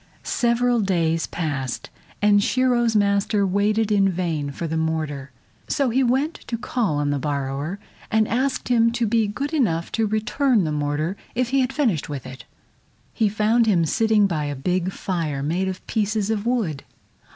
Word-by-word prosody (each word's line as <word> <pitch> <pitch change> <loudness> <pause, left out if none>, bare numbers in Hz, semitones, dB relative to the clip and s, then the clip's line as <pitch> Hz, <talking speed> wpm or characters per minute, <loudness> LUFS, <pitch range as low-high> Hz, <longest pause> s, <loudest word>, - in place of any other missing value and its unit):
Several 240 0 +1
days 165 -4 +1
passed, 140 -7 -4 0.3
and 205 -1 +5
Shiro's 240 -2 +2
master 200 0 +2
waited 210 +3 +1
in 195 -2 +4
vain 165 -5 -2
for 140 +4 -5
the 160 0 -2
mortar, 155 -4 -2 0.4
so 275 -4 +1
he 260 +3 +2
went 265 +6 +1
to 235 - -2
call 220 - -1
on 145 0 0
the 145 - -1
borrower, 140 +4 -3 0.3
and 220 -1 +2
asked 260 +3 -1
him 230 -1 +4
to 240 0 0
be 225 0 +2
good 275 +9 -4
enough 170 - 0
to 225 -1 0
return 225 +2 +1
the 155 - -1
mortar 150 +5 -1 0.2
if 250 0 0
he 270 +1 +2
had 255 0 0
finished 240 - 0
with 140 -4 -5
it. 130 0 -10 0.7
He 220 -3 +2
found 220 +3 +2
him 175 -6 +3
sitting 220 +4 +3
by 160 -6 -1
a 145 0 -3
big 180 +6 -1
fire 160 -8 -3
made 175 +6 0
of 185 -1 -5
pieces 215 0 0
of 215 0 -2
wood. 205 - -1
200 Hz, 175 wpm, -23 LUFS, 160-230 Hz, 0.7 s, and